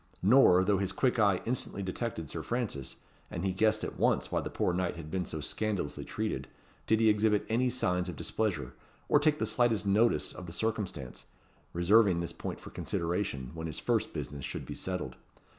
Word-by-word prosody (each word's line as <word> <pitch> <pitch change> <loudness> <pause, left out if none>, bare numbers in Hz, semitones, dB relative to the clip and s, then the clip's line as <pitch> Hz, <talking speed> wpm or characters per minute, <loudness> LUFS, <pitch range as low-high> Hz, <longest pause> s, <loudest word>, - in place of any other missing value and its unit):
Nor, 100 -4 +6
though 100 0 +2
his 100 -1 -1
quick 125 -2 +1
eye 100 -3 +3
instantly 115 -4 -2
detected 95 -3 -3
Sir - - -5
Francis, 105 - -3 0.3
and 85 - -4
he 95 - +1
guessed 110 +2 +2
at - - -5
once - - +2
why - - +1
the - - -4
poor 90 - 0
knight 90 -1 -1
had 80 -2 -8
been 90 -2 -1
so 80 - -4
scandalously 100 -2 -2
treated, - - -3 0.4
did 110 0 +4
he 115 - +4
exhibit 105 0 +3
any 125 +3 +2
signs 90 -7 0
of 85 - -5
displeasure, 95 -2 -2 0.3
or 150 - +5
take 150 0 +3
the 110 - 0
slightest 110 -1 +2
notice 110 +4 +3
of 90 - -8
the 85 - -7
circumstance; 100 - -3 0.5
reserving 95 +1 +4
this 85 - -3
point - - -5
for - - -11
consideration, 85 -7 -2
when 80 0 -5
his 80 - -5
first - - 0
business 70 -2 -5
should - - -5
be - - -6
settled. 90 -1 -4
100 Hz, 190 wpm, -31 LUFS, 85-110 Hz, 0.5 s, Nor